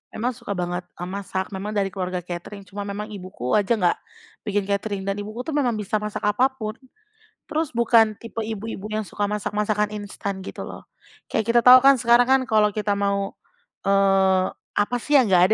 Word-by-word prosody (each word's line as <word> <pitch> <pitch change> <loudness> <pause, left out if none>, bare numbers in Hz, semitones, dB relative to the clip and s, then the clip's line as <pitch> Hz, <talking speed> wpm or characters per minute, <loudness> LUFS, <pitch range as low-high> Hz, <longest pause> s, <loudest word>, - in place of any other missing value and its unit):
memang 245 +3 0
suka 235 -5 -6
banget, 175 0 -3
eee, 175 - -6
masak. 190 0 -4
Memang 200 +2 -5
dari 195 -1 0
keluarga 185 -2 -3
catering, 180 +3 -7
cuma 200 +2 -7
memang 210 +2 -5
ibuku 185 - -6
aja 210 +3 +3
nggak 180 -5 +2 0.5
bikin 205 -1 +1
catering, 200 0 -2
dan 195 +1 -2
ibuku 215 +4 -5
tuh 320 - -5
memang 250 -6 +1
bisa 210 0 -1
masak 210 0 -5
apa 210 +6 +3
pun, 215 -3 -5 0.7
terus 310 -1 -1
bukan 225 -2 +4
tipe 225 -1 -5
ibu-ibu 215 -1 -5
yang 215 -1 -2
suka 205 - -3
masak, 210 0 -3
masakan 210 0 0
instan 200 -1 -5
gitu - - -7
loh. - - -9 0.5
Kayak 220 - +1
kita - - +8
tahu 250 +1 +10
kan, 275 +1 +6
sekarang 240 0 +4
kan, 265 0 +4
kalau 215 -4 +3
kita 210 -1 0
mau, 200 0 0 0.6
eee, 195 -1 +4 0.3
apa 205 +4 +1
sih 295 +5 0
yang 240 -8 +5
nggak 180 -1 +6
205 Hz, 190 wpm, -23 LUFS, 195-225 Hz, 0.7 s, tahu